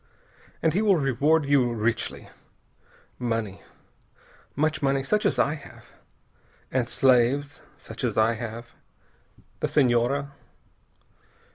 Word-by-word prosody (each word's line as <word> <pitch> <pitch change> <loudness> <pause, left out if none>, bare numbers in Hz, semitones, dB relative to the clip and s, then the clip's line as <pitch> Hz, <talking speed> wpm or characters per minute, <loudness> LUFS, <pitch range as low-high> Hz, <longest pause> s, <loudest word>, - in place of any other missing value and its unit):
And 160 - +3
he 195 - +1
will 205 -3 +4
reward 145 +2 +2
you 135 -4 +3
richly. 115 +1 -2 0.9
Money, 115 -5 -3 0.9
much 155 +2 0
money, 135 -1 +1
such 210 +10 +1
as - - -1
I 145 - +2
have. 145 -2 -12 0.9
And 125 -2 0
slaves 135 +2 +2 0.2
such - - -9
as - - -1
I 110 +1 +4
have. 115 +1 -7 0.9
The - - 0
Senhora...." 135 +1 +1
135 Hz, 110 wpm, -25 LUFS, 120-145 Hz, 0.9 s, will